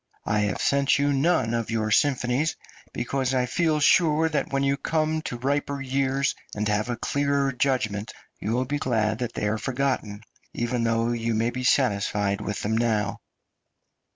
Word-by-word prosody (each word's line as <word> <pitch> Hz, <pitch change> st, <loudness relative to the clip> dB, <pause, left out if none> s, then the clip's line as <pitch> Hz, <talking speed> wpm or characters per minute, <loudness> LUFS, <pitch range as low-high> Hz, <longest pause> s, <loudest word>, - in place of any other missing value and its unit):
I 105 Hz, 0 st, +1 dB
have 105 Hz, -2 st, 0 dB
sent 140 Hz, 0 st, +2 dB
you 145 Hz, 0 st, +2 dB
none 135 Hz, -5 st, +2 dB
of 115 Hz, -1 st, -2 dB
your 110 Hz, -1 st, -1 dB
symphonies 135 Hz, +3 st, +2 dB, 0.4 s
because 130 Hz, +1 st, -1 dB
I 125 Hz, -1 st, +2 dB
feel 155 Hz, +3 st, +1 dB
sure 160 Hz, +1 st, +4 dB
that 150 Hz, -2 st, -2 dB
when 135 Hz, 0 st, +1 dB
you 140 Hz, 0 st, +2 dB
have 140 Hz, -, -6 dB
come 155 Hz, 0 st, 0 dB
to 125 Hz, -, -5 dB
riper 140 Hz, +2 st, -1 dB
years, 135 Hz, 0 st, 0 dB, 0.2 s
and 105 Hz, +1 st, -1 dB
have 105 Hz, +2 st, 0 dB
a 120 Hz, -, -1 dB
clearer 140 Hz, -1 st, 0 dB
judgment, 115 Hz, -6 st, -1 dB, 0.3 s
you 110 Hz, -, -2 dB
will 125 Hz, +2 st, +1 dB
be 145 Hz, +3 st, -2 dB
glad 110 Hz, -4 st, 0 dB
that 120 Hz, -2 st, -3 dB
they 105 Hz, -, -1 dB
are 110 Hz, +1 st, -1 dB
forgotten, 125 Hz, -5 st, -2 dB, 0.3 s
even 120 Hz, 0 st, -1 dB
though 115 Hz, +1 st, +1 dB
you 115 Hz, -1 st, -1 dB
may 115 Hz, +2 st, +1 dB
be 125 Hz, +1 st, -4 dB
satisfied 105 Hz, -5 st, +1 dB
with 105 Hz, -1 st, -4 dB
them 110 Hz, +2 st, 0 dB
now." 110 Hz, -3 st, 0 dB
125 Hz, 180 wpm, -25 LUFS, 110-140 Hz, 0.4 s, sure